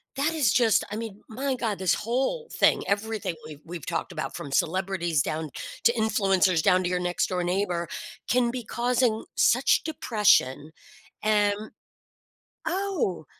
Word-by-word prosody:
that 290 +4 0
is 285 -11 +2
just 235 -4 +3
I - - -3
mean, 220 -2 -6
my 265 +4 -2
god. 225 -5 -2
This 185 -1 +2
whole 265 - -1
thing, - - +3
everything 205 -3 -1
we've 150 -2 -10
we've 170 -2 -7
talked - - -3
about - - -4
from 140 - -7
celebrities 175 -3 +1
down 155 +2 -3 0.3
to 235 - +5
influencers 195 -6 +2
down 185 -1 +4
to 175 - 0
your 180 0 0
next 180 0 0
door 180 -1 -2
neighbor 175 -2 -1 0.4
can 245 0 +3
be 245 0 -4
causing 240 0 0
such - - +3
depression, 210 - +2 0.5
an 210 0 +1 0.9
Oh. 345 - -1
205 Hz, 150 wpm, -26 LUFS, 180-240 Hz, 0.9 s, to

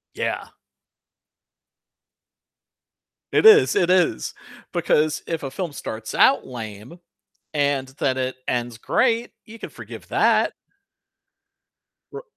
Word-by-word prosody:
Yeah. - - -3 2.8
It 440 - +6
is, 435 0 +7
it 175 - +2
is. 180 - +1 0.4
Because 155 0 +1
if 165 -2 -3
a 135 - -4
film 175 -6 -4
starts 110 -4 -6
out 275 - +4
lame 115 - -9 0.5
and 140 -3 0
then 130 -1 0
it 130 0 -2
ends 120 -1 -2
great, 235 - +1
you 225 +1 -12
can - - -7
forgive - - -11
that. - - +2 1.6
R 435 +3 -8
145 Hz, 105 wpm, -22 LUFS, 125-185 Hz, 2.8 s, is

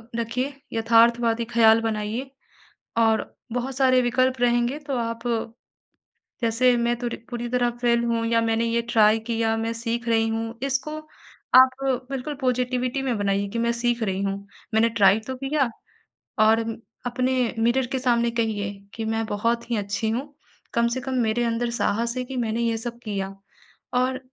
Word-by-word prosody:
रखिए 245 +4 -2 0.2
यथार्थवादी 230 0 +3
ख़्याल 230 -1 +5
बनाइए 225 +3 -2 0.7
और 225 -1 +2 0.2
बहुत 250 +2 -3
सारे 260 -1 +4
विकल्प 255 +1 +1
रहेंगे, 240 +3 +2
तो 285 -3 -4
आप 230 0 -3 1.2
जैसे 240 +2 +3
मैं 235 0 +1
तो 240 -1 -2 0.2
पूरी 240 0 -4
तरह 245 -1 +2
फ़ेल 235 -1 +3
हूँ 230 -1 0
या 230 0 +2
मैंने 225 0 +1
ये 230 0 +1
ट्राई 215 0 +5
किया, 225 0 -1
मैं 225 +1 -2
सीख 230 +1 -3
रही 225 0 +3
हूँ, 225 +1 -3
इसको 275 +3 -2 0.6
आप 260 0 +9 0.4
बिल्कुल 270 +3 -3
पॉज़िटिविटी 250 +1 0
में 255 -4 -1
बनाइए 200 0 0
कि 230 - -3
मैं 235 0 +2
सीख 240 0 0
रही 195 -2 -1
हूँ। 195 0 -1 0.4
मैंने 225 +1 +4
ट्राई 210 -2 +4
तो 260 - -3
किया 270 -1 0 0.7
और 220 +1 +5 0.5
अपने 250 0 0
मिरर 240 +3 +2
के 260 - 0
सामने 235 -2 +2
कहिए 220 -4 -1 0.2
कि 225 - -4
मैं 225 0 -1
बहुत 230 +3 -1
ही - - +2
अच्छी 205 +2 -2
हूँ, 275 +5 -4 0.4
कम 235 0 +3
से 260 +2 -2
कम 265 +1 -4
मेरे 220 +2 +1
अंदर 235 +1 0
साहस 235 0 0
है 255 - -1
कि 265 +1 -7
मैंने 230 -1 -1
ये 230 -1 +1
सब 235 +1 -6
किया 195 -2 -3 0.6
और 255 +1 +1
235 Hz, 165 wpm, -24 LUFS, 225-250 Hz, 1.2 s, आप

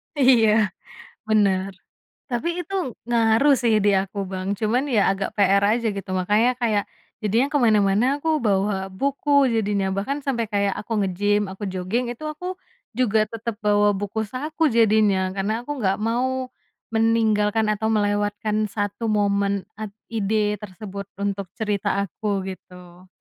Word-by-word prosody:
Iya, 225 -7 +4 0.6
bener, 195 -2 +2 0.6
tapi 245 +8 -1 0.2
itu 390 - -8 0.3
ngaruh 235 +4 +4
sih 230 -2 +3
di 205 - +5
aku, 200 +1 -6
Bang, 185 0 -4
cuman 230 +4 +1
ya 220 -4 +3
agak 195 0 -3
PR 200 0 +4
aja 235 0 0
gitu, 195 -1 -6
makanya 210 +6 +3
kayak 215 -4 +1 0.4
jadinya 225 +6 +2
kemana-mana 215 -5 +3
aku 320 - -3
bawa 200 -1 +2 0.2
buku, 280 +8 -2 0.2
jadinya 205 -3 0
bahkan 240 +9 -2
sampai 235 -4 0
kayak 200 -1 +1
aku 225 - -7
ngegym, 205 +3 +1
aku 195 - -12
joging, 190 +7 -1
itu 245 +6 -8
aku 360 +4 -9 0.5
juga 225 -4 +2
tetap 230 0 -4
bawa 205 0 +3
buku 205 +2 -3
saku 300 +8 -5
jadinya. 215 -3 +4 0.2
Karena 200 +2 -1
aku 295 - -10
nggak 195 -2 +1
mau 255 +3 -1 0.4
meninggalkan 220 -1 +2
atau 220 +1 -1
melewatkan 205 0 0
1 205 +2 -3
momen 200 -2 +1 0.2
at 215 - -3 0.2
ide 210 -1 0
tersebut 200 0 -8 0.2
untuk 200 -1 -2
cerita 210 -3 -1
aku, 200 0 -3
gitu. 180 -1 -12
210 Hz, 140 wpm, -23 LUFS, 200-230 Hz, 0.6 s, di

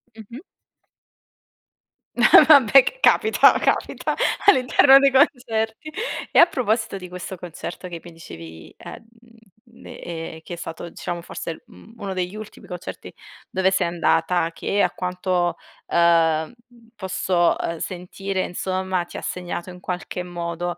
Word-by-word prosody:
Mh-mh. 230 - -11 1.7
Eh, 300 - +7
vabbè, 275 -3 +7
c - - -5
capita, 440 - +4
capita - - -1 0.3
all'interno 270 -5 +6
dei 275 0 +4
concerti. 245 -1 0 0.4
E - - -1
a 340 - +9
proposito 225 - -2
di 180 -2 -10
questo 180 +1 -7
concerto 175 +1 -8
che 170 -2 -8
mi 175 - -12
dicevi, 80 - -12
ehm, - - -11 0.8
ehm, 165 -1 -8
che 175 - -8
è - - -4
stato, 170 0 -8
diciamo, 170 +1 -6
forse, 165 - -7
mhmm, 220 - -17
uno 200 -3 -5
degli 180 +2 -4
ultimi 215 0 -11
concerti 180 -1 -8 0.4
dove 190 0 +1
sei 190 - +1
andata, 170 0 0
che 200 +4 -1
a 180 - +1
quanto, 180 -1 -2 0.3
ehm, 165 0 +2 0.4
posso 185 -3 0 0.2
sentire, 185 +2 -4
ehm, - - -4
insomma, 185 0 -2
ti - - -10
ha - - -6
segnato 180 0 -5
in 180 - -12
qualche 180 0 -5
modo, 175 0 -5
180 Hz, 135 wpm, -22 LUFS, 175-215 Hz, 1.7 s, a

